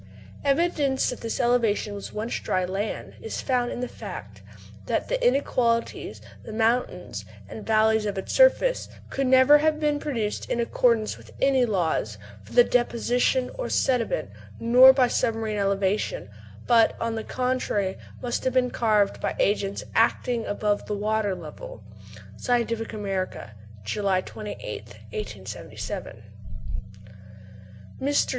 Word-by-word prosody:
Evidence 280 -2 +1
that 250 - -7
this 230 - -3
elevation 230 -4 +2
was 200 -1 -7
once 215 +3 -3
dry 185 -1 0
land 195 +4 -4
is 450 - -5
found 250 -2 0
in - - -4
the 250 - -2
fact - - -9 0.5
that - - -1
"the - - -1
inequalities, 235 - 0 0.2
the - - -9
mountains 230 +3 0 0.2
and 215 - -9
valleys 220 0 +3
of 200 - -3
its 190 - -4
surface, - - +4 0.2
could 270 -1 0
never 260 +3 +7
have 305 0 +1
been 295 -1 +1
produced 230 -9 -3
in 240 - 0
accordance 230 -2 +1
with - - -15
any 265 -2 +3
laws 165 - 0 0.3
for 105 - -14
the 245 - +8
deposition 245 +1 +1
of - - -3
sediment, 230 - +1 0.3
nor 250 +3 +8
by 260 -2 +3
submarine 225 -3 -1
elevation; 195 - 0 0.3
but, 230 -2 +4
on 230 0 -1
the 220 -1 -3
contrary, 250 -7 -1 0.3
must 240 -1 -2
have 260 - 0
been 250 -1 +2
carved 210 -3 +2
by - - -1
agencies 200 -1 0
acting 230 +1 +1
above 205 0 0
the 210 - -2
water 210 -1 0
level." 155 - -10 0.5
(Scientific 230 - 0
American, 195 - -4 0.3
July 195 - 0
28th, 120 - -7 0.2
1877.) 105 +1 -6 1.8
Mr. 285 +2 +2
225 Hz, 135 wpm, -25 LUFS, 200-250 Hz, 1.8 s, the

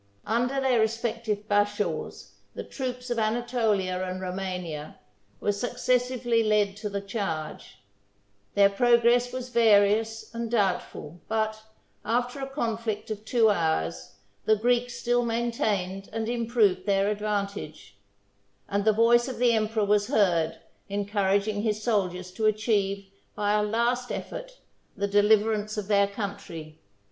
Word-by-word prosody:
Under 245 +5 0
their 260 -3 +2
respective 220 -1 -1
bashaws, 205 0 -1 0.2
the - - -5
troops 250 -2 -5
of 235 - 0
Anatolia 215 -5 0
and 185 0 -4
Romania 180 -5 -5 0.4
were 205 - +1
successively 245 +1 0
led 210 -2 +2
to 210 0 -4
the 200 0 -3
charge; 195 -7 -5 0.8
their 200 -1 +7
progress 240 +3 +3
was 255 0 -5
various 220 -1 +3
and 230 0 -3
doubtful; 185 -6 -1
but, 220 0 -1 0.4
after 245 +4 -1
a 270 0 -4
conflict 225 -5 -3
of 210 -1 -5
two 225 -2 +4
hours, 80 - -1 0.3
the 220 - +5
Greeks 245 +2 +1
still 245 0 +1
maintained 215 -5 -1
and 220 0 -3
improved 225 -5 +1
their 195 0 +2
advantage; 200 - -3 0.7
and 200 0 -1
the 220 - +5
voice 235 +3 +4
of 260 - -5
the 245 -1 +3
emperor 220 -1 +1
was 205 0 +2
heard, 180 - +2 0.3
encouraging 205 +1 0
his 215 -1 -1
soldiers 185 -5 -1
to 215 +3 0
achieve, 205 -2 0 0.3
by 205 0 +1
a 210 - +3
last 235 +4 0
effort, - - -6 0.4
the 200 +1 0
deliverance 210 +1 +2
of 205 -2 -3
their 200 -1 +4
country. 200 -7 -7
215 Hz, 130 wpm, -27 LUFS, 200-235 Hz, 0.8 s, their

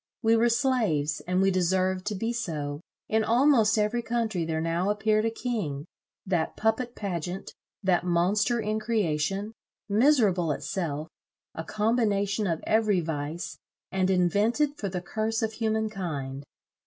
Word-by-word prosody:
We 225 0 +5
were 235 +1 +4
slaves, 225 - +1
and 180 +1 +2
we 195 - +4
deserved 185 +1 +1
to 210 - -1
be 225 +5 -2
so. 150 -10 -3 0.3
In 220 0 +2
almost 230 -2 +4
every 215 +3 +1
country 225 -7 -1
there 160 -1 -1
now 165 +4 0
appeared 215 +1 +2
a - - +2
king, 210 - -3 0.4
that 175 -4 -1
puppet 235 +3 0
pageant, 180 -2 -4 0.3
that 185 -3 +2
monster 190 +7 +2
in 215 0 -1
creation, 200 -2 -1 0.3
miserable 205 - +3
itself, 155 0 -3 0.5
a 160 - -5
combination 210 -1 +1
of 165 -2 -2
every 215 -3 +3
vice, 160 0 -4 0.3
and 190 -1 +1
invented 205 - +2
for 200 -8 -4
the 180 -1 -3
curse 220 +4 -2
of 220 0 -1
human 220 -1 0
kind. 145 -9 -5
200 Hz, 140 wpm, -27 LUFS, 175-225 Hz, 0.5 s, We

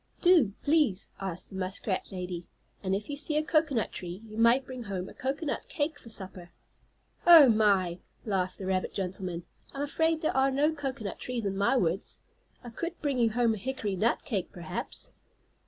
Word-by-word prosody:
"Do, 335 - +5
please," 285 - +2
asked 190 -2 -3
the - - -9
muskrat 185 +1 -2
lady. 180 -2 -5 0.3
"And 190 -1 0
if 205 +2 -4
you 290 - -4
see 300 +1 -1
a 305 - +2
cocoanut 305 -7 +1
tree 180 +3 -7
you 215 - -10
might 235 +4 +4
bring 255 -1 -7
home 190 -2 -4
a - - -11
cocoanut 280 - -3
cake 310 -8 -2
for 230 - -13
supper." 185 -4 -4 0.8
"Oh, 325 -6 +10
my!" 200 -5 +3 0.3
laughed 185 -3 -1
the 190 - -6
rabbit 185 0 -1
gentleman. 180 -2 -3 0.3
"I'm 275 - -2
afraid 320 +2 +1
there 315 - 0
are 265 +1 +4
no 290 +4 +2
cocoanut 265 - -4
trees 245 -3 -3
in 195 -1 -1
my 200 +7 +3
woods. 180 -2 -1 0.4
I 240 - -8
could 340 +8 -5
bring 280 -4 0
you 230 -1 +4
home 230 0 +2
a - - -4
hickory 215 -3 -3
nut 220 +6 +1
cake, 200 -8 -2
perhaps." 170 -3 -6
225 Hz, 185 wpm, -29 LUFS, 190-280 Hz, 0.8 s, Oh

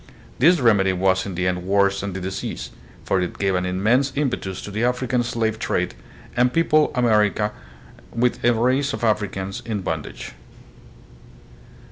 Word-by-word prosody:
This 170 +6 +5
remedy 100 -6 +3
was 95 +1 +1
in 95 - -5
the 90 +1 -1
end 90 -1 -1
worse 100 +1 +2
than 100 -1 -4
the 95 - -4
disease, 95 +1 -5 0.3
for 95 - +1
it 90 - -4
gave 95 -1 +1
an 90 0 0
immense 115 +9 +2
impetus 125 -10 -2
to 105 - -7
the 110 +3 -2
African 125 0 +1
slave 115 -2 -1
trade 90 -4 -1 0.4
and 125 +1 +3
peopled 155 0 +3
America 105 -3 +2 0.6
with 120 +1 0
a 120 - +5
race 130 +4 +1
of - - -5
Africans 105 -1 -1
in 110 -4 -3
bondage. 80 -4 -5
105 Hz, 155 wpm, -22 LUFS, 95-125 Hz, 0.6 s, This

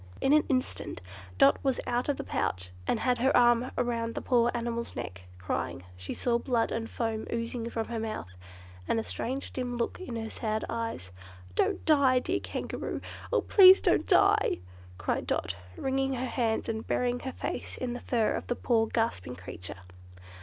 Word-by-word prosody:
In 270 - +3
an 305 - +6
instant 255 -1 -1 0.4
Dot 135 +6 +6
was 270 -2 +1
out 245 +3 0
of 285 - +1
the - - -4
pouch 90 -1 -2 0.2
and 225 - +1
had 250 -2 +2
her 265 +3 +4
arm 240 +1 +4
round 230 -2 -1
the - - -2
poor 240 -2 +3
animal's 235 0 -3
neck, 95 -6 -6
crying, 90 0 -3
as - - -17
she 90 0 -5
saw 235 -1 +1
blood 235 -2 +1
and 225 0 -3
foam 225 -2 -2
oozing 230 0 -3
from 225 -1 -3
her 235 -1 -2
mouth, 215 - -4 0.5
and 225 - +2
a - - -2
strange 265 +5 -4
dim 245 -2 -3
look 235 - -2
in 370 -11 -6
her 225 -1 -4
sad 215 -2 -2
eyes. 230 - -4 0.4
"Don't - - +1
die, 280 -4 +5
dear 250 - 0
Kangaroo! - - -4 0.3
Oh, - - +3
please 380 -1 +8
don't - - +2
die!" 410 +1 +4 0.4
cried - - -2
Dot, - - -1 0.2
wringing 270 0 0
her 255 0 -2
hands, 235 -3 0
and 220 -1 -3
burying 245 0 +1
her 260 - -5
face - - -4
in 250 -2 -3
the 245 - -5
fur 230 -4 +1
of - - -4
the 245 - 0
poor 225 -3 +2
gasping 220 - -1
creature. 90 0 -8
235 Hz, 185 wpm, -29 LUFS, 225-255 Hz, 0.5 s, please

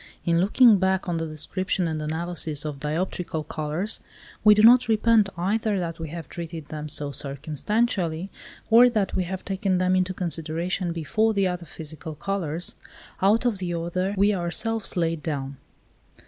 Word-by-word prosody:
In 170 0 +3
looking 215 +2 +6
back 190 0 +1
on 175 -2 -1
the 165 0 -2
description 180 +4 -2
and 155 -1 -3
analysis 160 -1 -1
of 145 -2 -4
dioptrical 160 +1 -3
colours, 155 +8 -3 0.4
we 210 -1 +8
do 210 - +4
not 245 +2 +7
repent 220 -2 +4
either 205 +3 0
that 170 -2 -3
we 160 -1 -5
have 165 -2 -7
treated 165 -3 -7
them 150 -1 -5
so 145 0 -3
circumstantially, 160 - -1 0.4
or 240 +2 +8
that 215 -5 0
we 185 - 0
have 185 +1 -5
taken 190 -1 0
them 185 0 +2
into 185 0 +1
consideration 170 +1 -2
before 215 +7 0
the 200 -1 +2
other 180 -2 -3
physical 155 0 -8
colours, 170 -1 -3 0.5
out 210 +6 +3
of 225 -6 +1
the 175 -2 -2
order 180 +4 -2
we 200 +2 +4
ourselves 190 +5 -2
laid 165 -2 0
down. 140 -3 -4
175 Hz, 160 wpm, -25 LUFS, 160-200 Hz, 0.5 s, we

